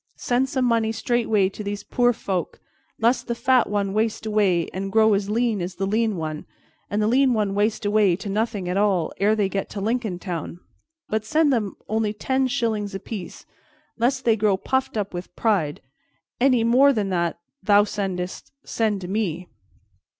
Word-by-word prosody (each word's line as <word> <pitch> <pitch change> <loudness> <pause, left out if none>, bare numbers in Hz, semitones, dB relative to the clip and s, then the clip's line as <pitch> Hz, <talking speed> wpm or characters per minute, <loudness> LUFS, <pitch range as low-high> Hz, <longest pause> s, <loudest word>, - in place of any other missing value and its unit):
Send 255 +2 0
some 260 -2 0
money 230 -2 +2
straightway 225 -3 +1
to 210 - -8
these 205 0 -4
poor 245 -1 +2
folk, 190 -6 -3 0.4
lest 235 +3 +1
the 235 - -1
fat 255 0 +3
one 200 -1 -1
waste 220 +1 -1
away 200 -6 +2
and 195 +1 -4
grow 220 0 +4
as 200 0 0
lean 225 -2 0
as 180 +1 -4
the 195 - -2
lean 215 0 0
one, 155 -2 -5 0.4
and 205 - -1
the - - +2
lean 255 +1 +3
one 205 -2 0
waste 210 +2 0
away 205 -3 +3
to 200 +3 -8
nothing 205 -2 -1
at 180 +2 -1
all, 195 -5 +1
ere 210 +2 +3
they 205 -2 +1
get 195 0 -3
to 205 - -6
Lincoln 220 -2 -1
Town; 175 -2 -5 0.5
but 215 0 -1
send 295 +5 +2
them 210 -5 -1
only 215 -1 0
ten 260 +5 0
shillings 220 -6 -1
apiece, 195 -1 -7 0.5
lest 260 +3 0
they 225 -2 +4
grow 205 -3 +2
puffed 265 +3 -1
up 205 -2 -2
with 175 +1 -7
pride, 185 -10 0 0.6
Any 250 -2 +4
more 260 +5 +5
than 210 -5 -1
that 170 -2 -1 0.2
that 190 - -26
thou 205 0 +6
sendest, 190 -3 -4
send 215 -3 -1
to 180 - -6
me. 180 -4 -2
210 Hz, 185 wpm, -23 LUFS, 195-230 Hz, 0.6 s, thou